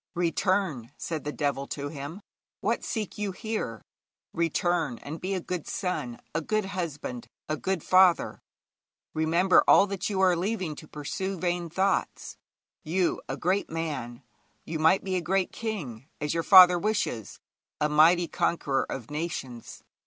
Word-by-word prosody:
'Return!' 170 - 0
said 160 -3 -4
the 150 - -2
devil 140 -2 -2
to 145 0 -4
him. 145 +6 -7 0.4
'What - - -1
seek 210 -4 -4
you 205 -2 -1
here? 185 - -4 0.5
Return, 165 -4 0
and 155 +6 -8
be 195 +2 -2
a - - -1
good 180 -2 -5
son, 180 - -3 0.2
a 165 - 0
good 215 +5 0
husband, 160 -10 -5 0.2
a 155 - -1
good 185 +1 -2
father. 185 -1 +4 0.7
Remember 170 +4 +4
all - - +7
that 195 -1 -3
you 195 -2 -1
are 185 -2 +4
leaving 185 -2 -2
to 155 - -10
pursue 170 +7 -4
vain 175 -1 -1
thoughts. 190 +4 -1 0.5
You, 175 +2 0
a - - -3
great 185 +4 0
man 140 -7 -4 0.4
you 160 0 -4
might 160 +5 +4
be 190 -1 -1
a - - -1
great 185 +2 0
king, 150 - -5
as 150 -1 -1
your 165 - 0
father 180 0 +8
wishes 200 - -2 0.4
a 150 - +2
mighty 165 +3 +5
conqueror 140 -6 0
of 130 0 -6
nations. 150 -6 -5
170 Hz, 150 wpm, -27 LUFS, 150-190 Hz, 0.7 s, father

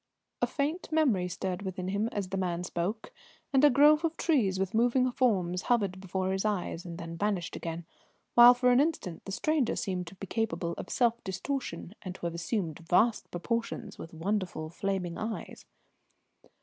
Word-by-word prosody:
A - - +3
faint 310 +4 -2
memory 255 - +2
stirred 180 +1 -3
within 185 -1 -4
him 205 +3 0
as 200 -3 -3
the 195 - -2
man 175 -2 -1
spoke, 185 - -3 0.4
and 270 +1 +4
a 295 - +9
grove 295 +4 +6
of 330 -1 -1
trees 220 - +2
with 190 -1 -1
moving 245 +3 +3
forms 185 -8 +1
hovered 200 -6 0
before 190 0 -2
his 190 0 -1
eyes 185 -5 -2
and 170 -1 -6
then 165 0 -6
vanished 200 -3 -1
again, 165 0 -5 0.5
while 240 +1 +9
for 250 0 +3
an 245 - +5
instant 280 - -1
the 195 - -6
stranger 295 +4 +1
seemed 180 -2 -2
to 195 - -10
be 195 - -7
capable 175 -5 -2
of - - -7
self 235 -1 +1
distortion 190 -2 -4
and 185 -1 -6
to - - -7
have 170 - -2
assumed 170 -1 -2
vast 190 +7 +2
proportions, 230 +3 -3
with 165 - -8
wonderful 175 -2 -2
flaming 190 -2 -2
eyes. 220 0 -5
195 Hz, 175 wpm, -30 LUFS, 180-240 Hz, 0.5 s, a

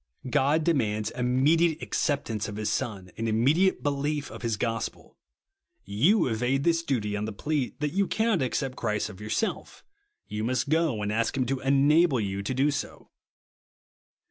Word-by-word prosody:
God 145 +6 +2
demands 110 -10 0
hwniediate 145 +7 +2
acceptance 130 - -1
of 105 - -6
his 105 0 -2
Son, 100 -8 -3
and 115 0 -1
immediate 145 - +2
belief 145 +1 -1
of - - -9
his 115 -3 -1
gos 115 +1 -1
pel. - - -22 0.7
You 160 - +3
evade 125 +4 0
this 165 0 +2
duty 115 -10 -1
on 105 0 -2
the 110 - -4
plea, 145 +5 -2
that 150 -1 0
as - - -11
you 200 -1 +2
cannot 220 -6 +1
accept 130 0 -2
Christ 105 0 -1
of 95 - -11
yourself, 110 - -3 0.4
you 105 +1 -4
must 125 +3 -1
go 155 -9 +1
and 105 - -1
ask 115 +4 0
him 130 - +1
to 135 +2 -1
enable 140 +2 +4
you 100 -2 -2
to 100 +6 -3
do 140 +3 +2
so. 140 - -6
130 Hz, 170 wpm, -27 LUFS, 110-150 Hz, 0.7 s, enable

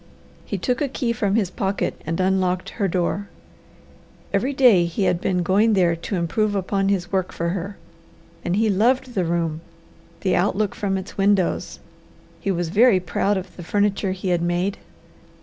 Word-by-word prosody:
He 200 - -3
took 245 - -1
a 290 - +2
key 245 -3 -1
from 205 -3 0
his 200 -5 +1
pocket 195 0 -2
and 165 +2 -2
unlocked 185 -1 +1
her 200 -4 -1
door. 185 +3 -1 1.0
Every 270 - +1
day 245 -10 +5
he 170 +4 -2
had 180 -2 +1
been 180 -2 0
going 205 +5 +3
there 175 -4 +3
to 170 +4 -5
improve 205 +5 0
upon 195 0 0
his 180 -3 -1
work 190 -2 0
for 170 0 -2
her, 195 +2 -4 0.7
and 175 - 0
he 220 +2 +2
loved 245 +5 +2
the 185 -5 0
room, 165 -2 -1 0.6
the 190 - +1
outlook 200 +2 +1
from 195 -2 -1
its 190 +1 -8
windows; 195 -2 +1 0.6
he 200 - -3
was 175 -3 -1
very 210 +2 +5
proud 195 +3 0
of 190 - -7
the 175 - -8
furniture 200 +1 0
he 185 0 -4
had 175 -1 +1
made. 175 +3 -1
190 Hz, 175 wpm, -22 LUFS, 175-205 Hz, 1.0 s, day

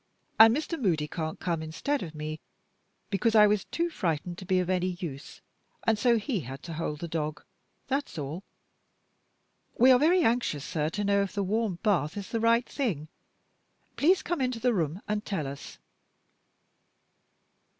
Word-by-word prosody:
And 225 +3 +8
Mr. 315 0 -4
Moody 160 -8 +1
can't 160 0 -4
come 170 -3 -1
instead 215 - -2
of 160 -3 -7
me, 155 +1 -5 0.7
because 220 +3 +1
I 210 -1 +8
was 210 -1 +2
too 340 0 -2
frightened 175 - -2
to 185 - -9
be 185 0 +2
of 180 - -1
any 185 -1 0
use, 145 -4 -7 0.4
and 225 - +4
so 235 +2 +3
he 220 0 -1
had 135 -1 -8
to 170 - -6
hold 155 -2 -4
the 170 - -3
dog. 155 -2 -3 0.4
That's 275 -8 -2
all. 150 +6 -5 1.3
We 255 +3 +7
are 250 - +6
very 340 +4 +4
anxious 225 - +1
sir, 155 -1 -1
to 205 +5 -3
know 200 0 +3
if 200 - -3
the 200 -1 -1
warm 210 -1 0
bath 195 -6 +1
is 200 -2 -6
the 230 - -1
right 230 +2 +3
thing. 175 - -2 0.9
Please 360 +6 +3
come 345 -5 -2
into 250 -2 -1
the 245 +1 +2
room 170 -1 -2
and 210 0 -1
tell 190 -8 -3
us." 140 +1 -8
195 Hz, 170 wpm, -28 LUFS, 160-230 Hz, 1.3 s, And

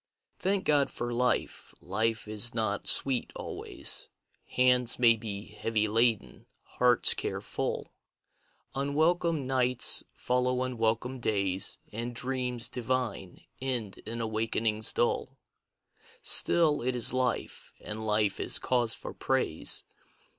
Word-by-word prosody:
Thank 195 +1 0
God 145 -2 +3
for 120 0 -4
life: 125 +1 -1
life 110 +4 -2
is 110 +2 +2
not 110 -3 -1
sweet 135 -3 +4
always. - - -2 0.4
Hands 125 -1 +2
may 115 -2 +6
he 105 -2 -6
heavy 110 0 -1
laden, 110 - 0 0.2
hearts 125 -1 +3
care - - -3
full, - - -4 0.8
Unwelcome 155 +2 0
nights 125 -1 +2
follow 125 0 -1
unwelcome 125 +1 -2
days, 100 -4 +1
And 115 +2 -5
dreams 125 -2 -2
divine 125 -6 -4 0.2
end 120 -7 -4
in 115 +1 -6
awakenings 110 -1 0
dull. 130 +2 -1 0.9
Still 155 -4 +3
it 125 +1 -1
is 120 0 +5
life, 130 -1 -2
anil 110 +1 -6
life 105 -2 +2
is - - +2
cause 120 -3 +1
for - - -8
praise. - - 0
120 Hz, 115 wpm, -29 LUFS, 110-130 Hz, 0.9 s, may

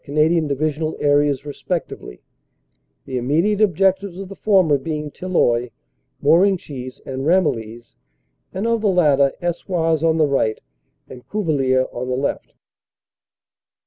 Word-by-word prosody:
Canadian 155 +2 +1
Divisional 155 +2 -2
areas 145 -1 +2
respectively, 145 - -5 0.8
the 130 -1 -3
im 120 - -5
mediate 190 +9 +1
objectives 190 -1 +1
of 195 -1 -7
the 195 - -9
former 185 -10 +3
being 150 +1 -4
Tilloy, 125 -11 0 0.5
Morenchies 155 -6 +1
and 135 0 -5
Ramillies, 120 - -1 0.5
and 190 +4 -4
of 230 -1 +1
the 215 - +1
latter 145 -7 +3
Eswars 170 -2 -1
on 165 0 +2
the 155 - +4
right 135 -6 0 0.5
and 125 -1 -13
Cuvillers 135 -10 +1
on 125 +1 -5
the 125 - -1
left. 140 - -3
155 Hz, 125 wpm, -20 LUFS, 135-180 Hz, 0.8 s, the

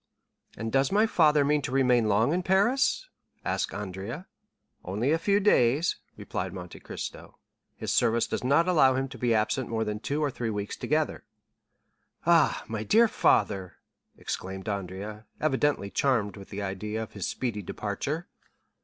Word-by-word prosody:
"And 115 0 -4
does 135 0 +2
my 210 +3 +4
father 150 -8 +4
mean 150 +1 +2
to 125 - -4
remain 125 -4 +3
long 110 +8 +3
in 180 - +1
Paris?" 220 - +2 0.4
asked - - -1
Andrea. 100 - -6 0.6
"Only 105 +10 -1
a 165 - +2
few 200 +4 +2
days," 155 - +3 0.2
replied 90 0 -4
Monte 90 -2 -8
Cristo. - - -8 0.4
"His - - -3
service 115 +1 +3
does - - -3
not 145 +7 +3
allow 135 -8 +5
him 135 +1 -1
to 120 -2 -1
absent 110 +5 +1
himself - - -12
more 110 -1 0
than 105 -1 -3
two 140 +6 -2
or 145 - 0
three 120 -2 -3
weeks 105 -1 -3
together." - - -1 1.0
"Ah, - - +4
my 110 -1 -3
dear 225 - +5
father!" 95 - +1 0.4
exclaimed 95 +1 -5
Andrea, 100 +2 -5
evidently 145 -8 +1
charmed 115 -7 +1
with 100 -2 -11
the 100 0 -5
idea 105 +3 -3
of 110 - -10
his 100 -3 -3
speedy 115 -5 -3
departure. 125 - -4
115 Hz, 160 wpm, -28 LUFS, 105-150 Hz, 1.0 s, allow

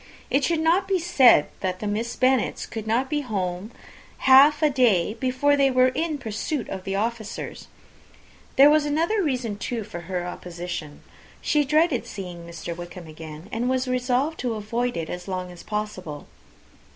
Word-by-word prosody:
It 275 - +2
should 330 +2 +1
not 350 +4 +2
be 385 -1 +2
said, 295 - +5
that 185 -1 -2
the - - -5
Miss 215 +3 -2
Bennets 260 0 +1
could 220 -1 -7
not 240 +5 +1
be 300 +2 -1
at 290 - -6
home 185 -3 -3 0.6
half 280 +4 +7
a 305 - +5
day 215 -8 +3
before 260 +2 +2
they 275 -1 +4
were 255 0 +4
in 315 +3 -2
pursuit 235 +2 -3
of 190 -1 -6
the 195 - -2
officers. 220 +1 -4 0.9
There 280 +2 +8
was 305 0 +4
another 330 +9 +1
reason, 250 - -2
too, 230 -1 -3
for 200 -4 -8
her 180 -2 -2
opposition. 175 -4 -6 0.4
She 300 -1 +2
dreaded 300 -2 +2
seeing 175 -4 -8
Wickham 170 +1 -7
again, 155 +1 -10
and 245 +1 -1
was 260 0 0
resolved 255 +5 0
to 240 -3 -1
avoid 235 +3 -2
it 165 -1 -3
as 180 +1 -6
long 185 -1 -4
as 175 - -11
possible. 190 -8 -5
235 Hz, 170 wpm, -24 LUFS, 185-275 Hz, 0.9 s, There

